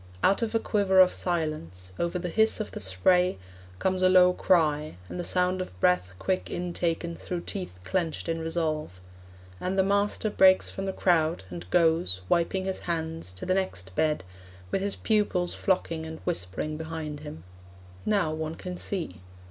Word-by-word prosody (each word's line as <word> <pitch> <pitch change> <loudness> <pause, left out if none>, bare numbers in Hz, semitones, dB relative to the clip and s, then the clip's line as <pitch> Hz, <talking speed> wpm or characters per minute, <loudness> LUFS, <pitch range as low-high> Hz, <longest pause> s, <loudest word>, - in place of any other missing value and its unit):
Out 195 - +4
of 230 0 -1
a - - +4
quiver 200 -4 +2
of 185 -1 +7
silence, 155 - -3
Over 170 +1 0
the 180 0 -3
hiss 220 +5 +2
of 215 - -4
the - - -6
spray, 180 - +2 0.4
Comes 185 - 0
a 185 - +5
low 180 -1 +6
cry, 155 - +2
and 180 - -6
the - - -2
sound 180 +1 +1
Of 90 - -8
breath 90 0 +2
quick 185 - -1
intaken 170 -1 -2
through 175 0 -4
teeth 180 - -6
Clenched 170 - -2
in 165 0 -1
resolve. 160 - -2 0.6
And 185 +1 -2
the 190 - +5
master 200 +2 +1
Breaks 190 -1 +5
from 195 0 -4
the - - 0
crowd, 170 - +2
and 90 0 -8
goes, 160 - +2
Wiping 180 +2 +1
his 190 0 -2
hands, 160 - -3
To 90 - -7
the 185 - +2
next 95 - -2
bed, 155 0 +1 0.5
with - - 0
his 200 +1 -1
pupils 205 -5 +1
Flocking 165 -4 -1
and 160 0 -7
whispering 95 +13 -2
behind 160 -2 -5
him. 150 - -9 0.6
Now 200 -7 +1
one 160 0 -3
can 180 +1 -6
see. 165 - -4
170 Hz, 170 wpm, -27 LUFS, 155-185 Hz, 0.6 s, of